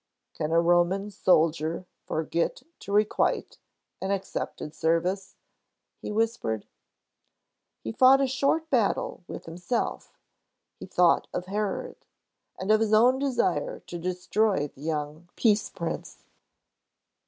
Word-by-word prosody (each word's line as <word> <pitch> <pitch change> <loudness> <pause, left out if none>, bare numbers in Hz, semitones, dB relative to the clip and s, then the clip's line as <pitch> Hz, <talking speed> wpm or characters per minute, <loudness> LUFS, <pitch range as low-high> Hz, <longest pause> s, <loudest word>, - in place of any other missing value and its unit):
"Can 155 - -3
a 165 - +5
Roman 175 +4 +2
soldier 165 -2 +2 0.2
forget 165 +1 -1 0.2
to - - -8
requite 210 +1 +1 0.4
an 190 - -2
accepted 190 -5 -3
service?" 180 +5 0 0.6
he - - -6
whispered. 210 - -1 1.2
He 110 - -3
fought 260 - +6
a 275 - +3
short 275 +5 0
battle 230 -6 +1
with - - -8
himself. 180 +8 -3 0.6
He - - -8
thought 180 -2 +3
of 180 - -2
Herod, 205 +1 -3 0.6
and 190 +3 -1
of 215 - +5
his 220 -1 +1
own 250 +4 +5
desire 325 - 0
to 175 - -8
destroy 180 -1 0
the 135 - -18
young 155 +2 -4
Peace 215 -2 +2
Prince. - - -6
190 Hz, 120 wpm, -27 LUFS, 165-220 Hz, 1.2 s, fought